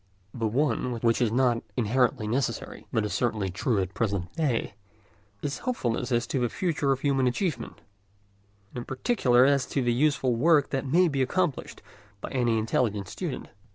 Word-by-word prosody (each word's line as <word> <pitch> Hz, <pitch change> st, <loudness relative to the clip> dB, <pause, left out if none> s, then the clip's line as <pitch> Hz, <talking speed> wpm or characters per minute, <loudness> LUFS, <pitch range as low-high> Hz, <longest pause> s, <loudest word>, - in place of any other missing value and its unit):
The 115 Hz, -2 st, -1 dB
one, 125 Hz, -1 st, 0 dB
which 115 Hz, 0 st, +2 dB
is 115 Hz, -3 st, +2 dB
not 120 Hz, -1 st, +2 dB, 0.2 s
inherently 125 Hz, +1 st, +1 dB
necessary, 125 Hz, +3 st, -3 dB
but 110 Hz, -2 st, +1 dB
is 105 Hz, -, -3 dB
certainly 110 Hz, -6 st, 0 dB
true 105 Hz, +4 st, 0 dB
at 95 Hz, -1 st, -1 dB
the -, -, -27 dB
present 100 Hz, -5 st, -2 dB
day, 135 Hz, -9 st, 0 dB, 0.7 s
is 145 Hz, -1 st, -3 dB
hopefulness 125 Hz, -, -2 dB
as 120 Hz, 0 st, +2 dB
to 135 Hz, -, -2 dB
the 120 Hz, -1 st, +1 dB
future 150 Hz, -5 st, 0 dB
of 135 Hz, 0 st, 0 dB
human 135 Hz, -3 st, +2 dB
achievement, 125 Hz, -, -2 dB, 0.9 s
and -, -, -6 dB
in 120 Hz, -, -7 dB
particular 130 Hz, -, +3 dB
as 140 Hz, -1 st, +2 dB
to 135 Hz, -, -1 dB
the 120 Hz, -1 st, +2 dB
useful 135 Hz, -1 st, +2 dB
work 150 Hz, +3 st, +3 dB
that 135 Hz, 0 st, -2 dB
may 175 Hz, +7 st, +4 dB
be 140 Hz, -4 st, -1 dB
accomplished 165 Hz, +2 st, -1 dB, 0.4 s
by -, -, -7 dB
any 120 Hz, -4 st, +1 dB
intelligent 110 Hz, -3 st, 0 dB
student. -, -, -5 dB
125 Hz, 175 wpm, -27 LUFS, 115-140 Hz, 0.9 s, may